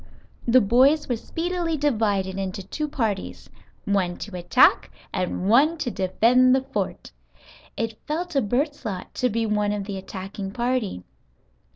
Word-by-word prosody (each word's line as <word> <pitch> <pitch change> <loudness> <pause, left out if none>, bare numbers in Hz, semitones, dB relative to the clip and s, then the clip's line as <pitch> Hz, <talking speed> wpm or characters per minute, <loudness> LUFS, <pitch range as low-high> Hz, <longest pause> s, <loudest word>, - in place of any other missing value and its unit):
The 250 +2 +6
boys 260 +9 +4
were 245 - 0
speedily 335 +5 -2
divided 205 -9 0
into 195 +1 -4
two 300 +11 -4
parties, 225 -9 -3 0.3
one 185 -3 0
to 205 -3 -7
attack 180 +9 +4 0.2
and 185 0 -2
one 285 +10 +4
to 250 -6 -2
defend 235 +8 +3
the 265 - +1
fort. - - -4 0.7
It 225 -1 -3
fell 320 +4 -1
to 315 -6 0
Bert's 280 +8 -1
lot 195 -6 -5
to 250 - 0
be 225 +1 -1
one 210 -1 +1
of 205 -1 -2
the 195 -1 -5
attacking 195 +1 -7
party. 240 - -1
225 Hz, 150 wpm, -24 LUFS, 195-265 Hz, 0.7 s, The